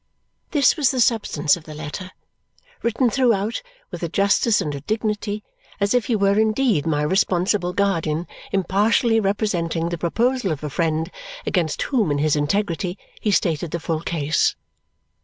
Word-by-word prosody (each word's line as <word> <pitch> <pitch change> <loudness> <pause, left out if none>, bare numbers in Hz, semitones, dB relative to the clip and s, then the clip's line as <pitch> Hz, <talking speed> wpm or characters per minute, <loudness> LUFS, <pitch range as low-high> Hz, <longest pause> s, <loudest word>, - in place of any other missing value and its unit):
This 285 -5 +4
was 290 -5 +3
the 260 - -1
substance 205 -11 +2
of 170 -3 -12
the 155 - -9
letter, 155 +5 -6 0.7
written 235 +1 +1
throughout 230 - +1 0.3
with - - -6
a 170 - -2
justice 200 +4 +3
and 150 - -2
a 140 - -6
dignity 210 +2 -2 0.4
as 200 +2 +1
if 245 -2 +2
he 235 - +1
were 200 0 +3
indeed 220 - +2
my 150 -2 +1
responsible 180 +2 +1
guardian 175 -4 0 0.3
impartially 210 +5 +2
representing 175 -5 0
the 170 -1 -4
proposal 230 +4 +1
of 155 -1 -4
a 150 - -4
friend 160 +1 -1 0.3
against 165 -4 0
whom 235 - +1
in 145 - +1
his 150 +1 +2
integrity 175 +4 -1 0.2
he 215 - 0
stated 170 -4 +1
the 170 - -3
full 160 -1 -2
case. 155 -3 +1
190 Hz, 160 wpm, -22 LUFS, 160-215 Hz, 0.7 s, This